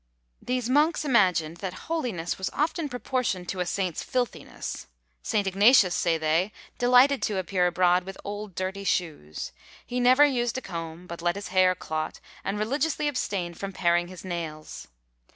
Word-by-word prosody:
These 250 -2 -1
monks 300 +4 +3
imagined 180 - +3
that 185 0 -5
holiness 235 - -2
was 190 - -1
often 310 +1 -1
proportioned 245 -7 -2
to 190 - -3
a 180 - -1
saint's 185 -3 -1
filthiness. 250 -2 -4 0.3
St. 205 - 0
Ignatius, 195 0 +5
say 170 -2 +1
they, 160 +5 +1 0.3
delighted 250 +3 +5
to 210 -3 -1
appear 185 -1 +1
abroad 180 0 +3
with 195 +1 -8
old 205 -2 -6
dirty 190 +1 -3
shoes; 155 - -2 0.3
he 250 - -3
never 255 +4 +6
used 245 -4 0
a - - -3
comb, 170 -3 -6
but 170 -1 -8
let 175 +1 +1
his 200 - -6
hair 185 0 +4
clot; 155 -2 -4 0.2
and 200 +2 -2
religiously 280 +7 0
abstained 195 -11 -2
from 195 0 -5
paring 175 -1 +2
his 185 0 -10
nails. 165 -4 -6
190 Hz, 160 wpm, -27 LUFS, 175-245 Hz, 0.3 s, never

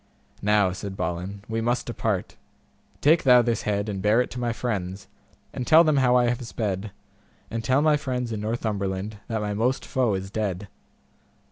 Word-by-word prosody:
Now, 105 -2 +3
said 95 +1 -6
Balin, 90 +3 -4
we 115 0 -2
must 120 +2 0
depart, 110 -5 -2 0.7
take 160 +3 +5
thou 125 -2 +6
this 115 -2 0
head 100 0 -1
and 100 -2 -3
bear 105 +4 +3
it 125 - 0
to 125 - -5
my 120 -1 0
friends, 95 -5 -4 0.5
and 125 - -4
tell 160 +1 +8
them 155 -3 +2
how 125 -2 +4
I 125 -1 +4
have 120 +1 -2
sped, 105 -2 -3 0.6
and 115 0 -3
tell 130 +5 +2
my 155 -1 +4
friends 125 -4 -3
in 110 -2 -3
Northumberland 105 -2 -2
that 110 -2 -2
my 105 -1 -2
most 120 +6 0
foe 125 -6 +1
is 95 +1 -5
dead. 100 -2 -3
110 Hz, 180 wpm, -25 LUFS, 100-125 Hz, 0.7 s, tell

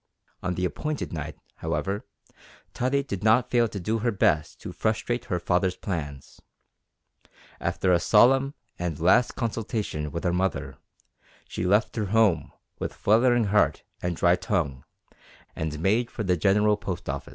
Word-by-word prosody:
On 90 0 -2
the 90 - -1
appointed 150 - -3
night, 75 -1 -5 0.2
however, 100 +2 -3 0.7
Tottie 140 +3 0
did 100 -8 -5
not 110 +3 +3
fail 120 -1 +4
to 105 - -6
do 110 +5 -1
her 120 +2 +1
best 80 -6 +1
to - - -6
frustrate 110 +5 -1
her 90 - -1
father's 90 +1 +1
plans. 75 -7 -6 1.2
After 90 -1 +1
a 85 - +4
solemn, 135 +9 +4 0.2
and 85 -4 -3
last, 105 +9 +3
consultation 110 - -3
with 85 +4 -5
her 90 -2 +1
mother, 95 +2 -2 0.7
she 90 - -3
left 105 +5 +2
her 110 - 0
home 105 -3 +2 0.3
with - - -4
fluttering 120 +3 +3
heart 105 0 +2 0.2
and 90 -1 -2
dry 85 +2 +4
tongue, 70 -11 -2 0.7
and 75 -1 -3
made 110 +8 +1
for 110 - -5
the 90 -2 +2
General 105 +4 +3
Post 95 -5 -5
Office. - - -4
100 Hz, 150 wpm, -26 LUFS, 85-115 Hz, 1.2 s, fail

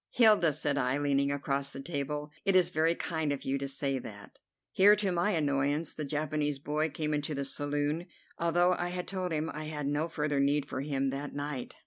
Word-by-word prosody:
"Hilda," 215 -9 +5
said 145 -1 0
I, 125 +1 +1
leaning 140 -1 +1
across 140 0 -1
the 135 - -8
table, 150 0 -3
"it 195 - +2
is 185 -1 +4
very 160 +2 +2
kind 160 -4 -2
of 140 - -4
you 135 +1 0
to 140 - -3
say 135 0 -1
that." 105 -4 -11 0.3
Here, 205 +2 +7
to 200 -2 0
my 175 +3 +1
annoyance, 145 0 0
the 155 - -4
Japanese 150 0 -1
boy 150 +3 -1
came 150 +1 -2
into 150 0 -2
the 140 0 -2
saloon, 145 +4 -1 0.3
although 175 +2 +3
I 175 0 -1
had 180 0 -4
told 185 -2 -3
him 155 0 -1
I 155 +1 -5
had 150 -2 -4
no 145 +3 0
further 150 -3 -1
need 140 +1 +2
for 130 - -4
him 135 -2 -1
that 140 +2 -5
night. 145 -3 -4
150 Hz, 205 wpm, -31 LUFS, 140-165 Hz, 0.3 s, Here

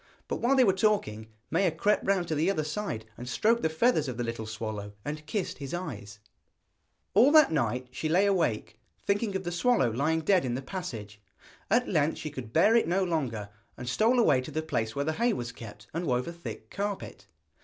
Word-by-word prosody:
But - - -2
while 250 +4 +2
they 260 - +6
were 195 -5 +4
talking, 190 - 0 0.2
Maia 180 +4 +3
crept 205 +6 +1
round 190 -3 +1
to - - 0
the 155 +4 +1
other 160 -6 0
side 150 - -4
and 125 +1 -6
stroked 225 - +2
the 160 - +1
feathers 160 - +2
of 125 -3 -4
the 120 - -1
little 115 -2 -4
swallow, 110 -2 -5
and 150 +1 -4
kissed 205 -9 -3
his 140 +3 -4
eyes. 105 - -6 1.0
All 240 +8 +6
that 310 - +7
night 125 -3 0
she 155 +4 -3
lay 185 +5 +4
awake, 160 - 0 0.3
thinking 200 0 0
of 190 - -2
the 175 - -3
swallow 175 - +2
lying 155 +7 +1
dead 185 +3 +3
in 120 -2 -1
the 130 - -3
passage. 110 - -6 0.5
At 240 +4 +3
length 155 -3 +1
she 155 - -5
could 130 -6 -7
bear 205 - +5
it 230 - +3
no 185 +3 +2
longer, 130 - -2 0.3
and 125 - -7
stole 220 - +3
away 215 - +4
to 130 - -8
the 155 - -3
place 115 -8 -2
where 140 0 -1
the 160 - 0
hay 235 +5 +1
was 120 - -4
kept, 105 -2 -11
and 170 +1 -2
wove 125 +1 0
a 170 - -5
thick 170 0 -9
carpet. 200 0 -4
160 Hz, 215 wpm, -28 LUFS, 120-195 Hz, 1.0 s, that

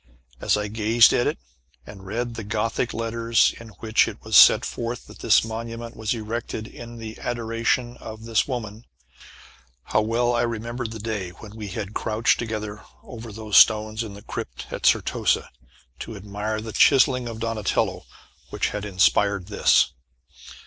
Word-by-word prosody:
As - - +2
I 105 0 -2
gazed 110 +2 +4
at 120 - +2
it, - - -1 0.5
and 95 -2 -12
read 120 +3 -3
the 115 - -6
gothic 110 +3 -1
letters 115 0 +1
in 115 - -11
which 110 0 +3
it - - -6
was - - -2
set - - +8
forth 120 +1 -5
that - - -14
this - - +4
monument 115 +1 -6
was 110 +1 -2
erected 110 0 -4
in 120 +1 -10 0.2
adoration 120 +1 -1
of 110 0 -9
this 115 -1 +1
woman, 115 -4 -5 1.0
how 110 - +1
well 120 +3 +1
I 120 - +1
remembered 115 +1 -3
the 110 - -7
day 105 -4 -4
when 105 +4 -13
we 110 -2 -6
had 100 +1 -5
crouched 110 +2 +1
together 105 -2 -4 0.2
over 115 -2 -9
those 105 -1 0
stones 110 0 +5
in 105 -3 -6
the 100 - -12
crypt - - -6
at - - 0
Certosa, - - +1 0.5
to 115 - -7
admire 105 +2 -4
the 110 0 -7
chiselling 130 -3 +4
of 115 -1 -6
Donatello 115 -2 -1 0.4
which - - -1
had 105 0 -5
inspired 100 0 +2
this. 105 - +3
110 Hz, 160 wpm, -24 LUFS, 105-115 Hz, 1.0 s, set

